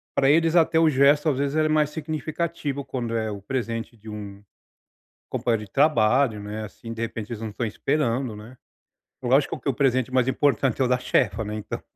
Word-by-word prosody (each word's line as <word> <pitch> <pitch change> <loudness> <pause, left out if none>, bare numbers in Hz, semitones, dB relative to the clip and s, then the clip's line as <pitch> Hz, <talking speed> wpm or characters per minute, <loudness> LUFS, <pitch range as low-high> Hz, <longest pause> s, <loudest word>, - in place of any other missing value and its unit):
pra 135 - +3
eles 165 +2 +4
até 160 -1 +4
o 160 -1 +5
gesto 145 +3 +4
às 135 - 0
vezes 140 +1 -1
ele 155 0 +3
é - - -2
mais 150 -1 +2
significativo 155 -2 -3
quando 120 -3 -3
é 110 -1 -1
o 100 -1 -7
presente 115 -1 -4
de 110 +1 -12
um 100 -1 -8 0.9
companheiro 115 -3 -1
de 95 - -22
trabalho, 130 -5 +3
né, 105 +1 -5
assim, 115 +2 -10
de 115 - -6
repente 115 -1 -4
eles 115 -1 -5
não 110 - -4
estão 115 +3 -3
esperando, 125 -1 -1
né, 115 +5 -12 0.7
lógico 135 +4 +2
que - - -8
o 135 - +2
presente 130 -1 +1
mais 130 -1 +3
importante 135 -2 +1
é - - +4
o - - +1
da 125 0 +2
chefa, 110 -4 +1
né, 105 +1 -5
então, 105 - -5
125 Hz, 205 wpm, -24 LUFS, 110-145 Hz, 0.9 s, o